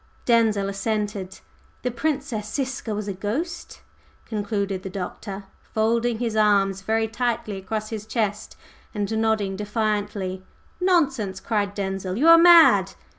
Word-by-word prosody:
Denzil 220 -4 +3
assented. 200 -1 -3 0.4
"The 250 - -1
Princess 245 -5 -2
Ziska 260 -5 -3
was 210 0 -4
a 200 - -2
ghost!" 275 - -4 0.4
concluded 205 -3 -2
the 190 - -6
Doctor, 195 +1 -6 0.3
folding 230 +1 +1
his 230 -2 -2
arms 200 -2 +3
very 220 +3 0
tightly 225 -3 -2
across 215 +3 -4
his 215 -1 -5
chest 215 -2 -2 0.4
and 210 +1 -2
nodding 215 -3 0
defiantly. 205 -2 -2 0.4
"Nonsense!" 275 - +1
cried 205 -1 -1
Denzil. 195 -1 -3
"You 310 +7 +4
are 330 0 +9
mad!" 340 -1 +7
215 Hz, 125 wpm, -24 LUFS, 200-235 Hz, 0.4 s, are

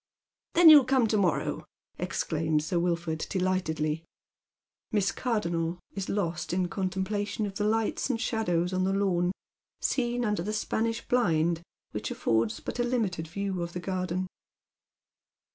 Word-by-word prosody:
"Then 335 -2 +9
you'll 290 -4 +9
come 260 -2 +3
to 215 - +2
morrow," 180 -6 0 0.4
exclaims 155 -1 0
Sir 170 +2 0
Wilford, 170 -2 -1
delightedly. 165 -4 0 0.9
Miss 205 -3 +2
Cardonnel 170 -8 -1 0.2
is 195 -1 -4
lost 165 -5 -1
in 180 -1 +1
contemplation 195 +3 -2
of 200 - -4
the 205 +1 -1
lights 225 +4 0
and 240 -3 0
shadows 180 -7 0
on 185 0 +1
the 190 +1 +1
lawn, 180 -3 +1 0.5
seen 245 -2 0
under 210 -5 0
the 210 +5 -3
Spanish 225 +1 -1
blind, 170 -8 +2 0.3
which 105 -1 -4
affords 115 -1 0
but - - -6
a - - +3
limited 215 -10 -1
view 195 +1 -3
of 170 0 -4
the 180 - -3
garden. 185 0 -2
185 Hz, 145 wpm, -28 LUFS, 170-215 Hz, 0.9 s, Then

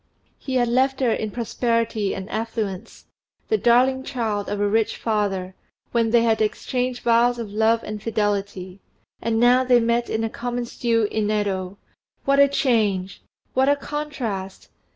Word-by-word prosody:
He 265 - -4
had 245 -1 +3
left 260 +3 +1
her 250 -4 +2
in 215 -1 -1
prosperity 230 -2 -1
and 190 0 -6
affluence, 220 -4 -4 0.4
the 435 - +3
darling 255 +2 +3
child 225 -7 -3
of 205 - -3
a 205 - +2
rich 220 +1 +1
father, 200 -4 -1 0.4
when 230 -1 +2
they 230 0 +4
had 225 -1 +2
exchanged 250 +3 -2
vows 240 +1 +3
of 225 -4 -6
love 225 +2 +2
and 210 0 -6
fidelity; 200 -4 -2 0.4
and 225 -1 0
now 245 +2 +5
they 250 -1 +4
met 235 +1 0
in 220 0 -1
a - - +1
common 245 0 -3
stew 230 -2 0
in 215 -1 0
Yedo. 200 -3 -2 0.5
What 275 0 +3
a 280 - +7
change! 215 -9 0 0.3
what 265 +2 +3
a 285 - +4
contrast! 270 -10 -5
230 Hz, 160 wpm, -23 LUFS, 205-245 Hz, 0.5 s, a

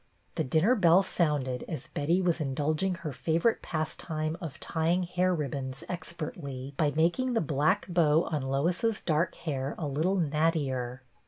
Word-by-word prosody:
The - - -1
dinner 160 - +3
bell 185 -4 +5
sounded 145 -9 0
as 150 -5 -5
Betty 170 +6 +1
was 170 -2 +1
indulging 155 +6 0
her 155 -3 -5
favorite 165 - +1
pastime 155 -1 -3
of 155 -2 -6
tying 170 +3 0
hair 180 +1 +1
ribbons 140 -3 -3
expertly 145 -6 -6
by 150 -1 +2
making 175 +11 +2
the 230 - +3
black 155 +6 +1
bow 165 -3 +3
on 150 -3 -2
Lois's 170 - 0
dark 160 +2 0
hair 140 -3 -3
a 160 - -3
little 155 +7 +1
nattier. 145 -6 0
160 Hz, 150 wpm, -29 LUFS, 145-175 Hz, -, bell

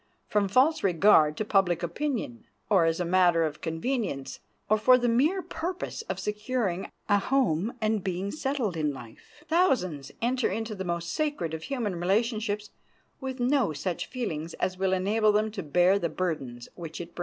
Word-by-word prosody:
From 205 -1 +1
false 265 +10 +3
regard 165 -5 +4
to 215 - -1
public 185 -5 +2
opinion, 190 - -3 0.2
or 185 -5 +5
as 165 +1 +1
a 180 - 0
matter 175 -1 +4
of 155 -1 -3
convenience, 165 - -3 0.3
or 215 +1 +3
for 250 +4 +6
the 245 -1 0
mere 300 +11 +2
purpose 350 +6 -4
of - - -2
securing 210 -3 -2 0.2
a 205 -1 +4
home 235 - +1
and 215 -3 0
being 190 +1 -2
settled 270 - -2
in 150 -2 0
life, 120 - -14
thousands 225 - +1
enter 250 +1 +1
into 225 0 -3
the 190 -2 -5
most 170 -1 -3
sacred 290 - -1
of 160 - -4
human 235 -9 -2
relationships 210 +2 0 0.5
with 265 -1 -5
no 245 - +2
such 170 +4 -3
feelings 170 -11 -4
as 185 0 -1
will 190 0 0
enable 210 +3 +2
them 215 +1 +1
to 205 -2 -5
bear 180 +5 +3
the 170 - -1
burdens 140 -9 -3
which 165 -3 -8
it 170 0 -8
brings. - - -12
200 Hz, 175 wpm, -28 LUFS, 170-245 Hz, 0.5 s, for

